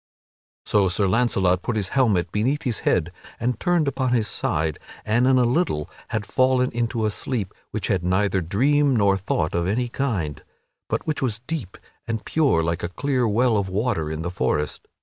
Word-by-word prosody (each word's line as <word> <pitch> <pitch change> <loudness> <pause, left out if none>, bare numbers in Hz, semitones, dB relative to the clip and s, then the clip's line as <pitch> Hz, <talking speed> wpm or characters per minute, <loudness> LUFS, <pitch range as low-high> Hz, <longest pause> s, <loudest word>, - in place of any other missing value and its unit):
So 100 -2 +3
Sir 95 +2 +1
Launcelot 95 -5 +2
put 120 - -2
his 100 -3 -1
helmet 110 -10 +2
beneath 130 +8 0
his 120 -5 -1
head 90 0 +1 0.3
and 125 +2 -1
turned 175 -4 +2
upon 130 -2 0
his 115 -3 +2
side, 80 -4 -1 0.3
and 120 +4 +2
in 130 -1 +5
a 125 - +4
little 120 - 0 0.2
had 110 -2 -3
fallen 130 +1 +2
into 115 -1 -1
a 105 - +1
sleep 105 -3 -3 0.2
which - - -3
had 90 -2 0
neither 95 +1 +1
dream 135 - +2
nor 100 -3 +4
thought 90 -4 -1
of 85 0 0
any 120 +5 0
kind, 100 - -2 0.5
but - - -1
which 155 - -1
was 115 -4 -1
deep 130 - -5 0.3
and 115 -2 -3
pure 140 - +2
like 85 +1 -1
to 85 - -3
a - - -12
clear 130 +4 0
well 115 +1 +2
of 100 -2 -1
water 95 -5 -1
in 80 +1 -4
the 85 - -3
forest. 75 -2 -2
110 Hz, 190 wpm, -23 LUFS, 90-125 Hz, 0.5 s, in